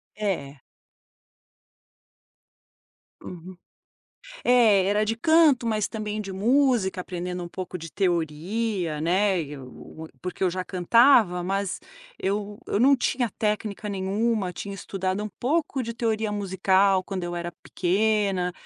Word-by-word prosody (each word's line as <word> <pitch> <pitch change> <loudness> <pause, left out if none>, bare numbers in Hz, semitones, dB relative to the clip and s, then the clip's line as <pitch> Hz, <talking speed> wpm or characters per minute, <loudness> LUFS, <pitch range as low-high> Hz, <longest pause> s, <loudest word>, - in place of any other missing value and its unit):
É. 160 -10 -3 2.6
Uhum. 180 +1 -10 0.9
É, 225 -6 +5
era 205 +2 +2
de 225 +2 -1
canto 300 -2 +4
mas 215 -2 0
também 215 -1 -4
de 195 -2 -5
música, 235 -3 +2
aprendendo 180 0 -5
um - - -6
pouco 180 +1 -6
de 165 -1 -9
teoria, 175 0 -1
né, 185 +4 +2
eu 145 +2 -10
m - - -24
porque 180 +1 -4
eu 185 - +3
já 185 +1 -3
cantava 190 0 +4
mas, 195 +1 -2 0.4
eu 205 +1 -2
eu 205 - -1
não 275 +3 +6
tinha 245 -2 0
técnica 210 0 -2
nenhuma, 200 0 -1
tinha 200 +2 -7
estudado 190 0 -3
um 210 - -4
pouco 285 -1 0
de 230 - -5
teoria 220 -2 -1
musical 195 -1 +2
quando 185 -1 -5
eu 175 0 -4
era 175 0 -4
pequena, 195 -1 0
195 Hz, 130 wpm, -25 LUFS, 180-220 Hz, 2.6 s, não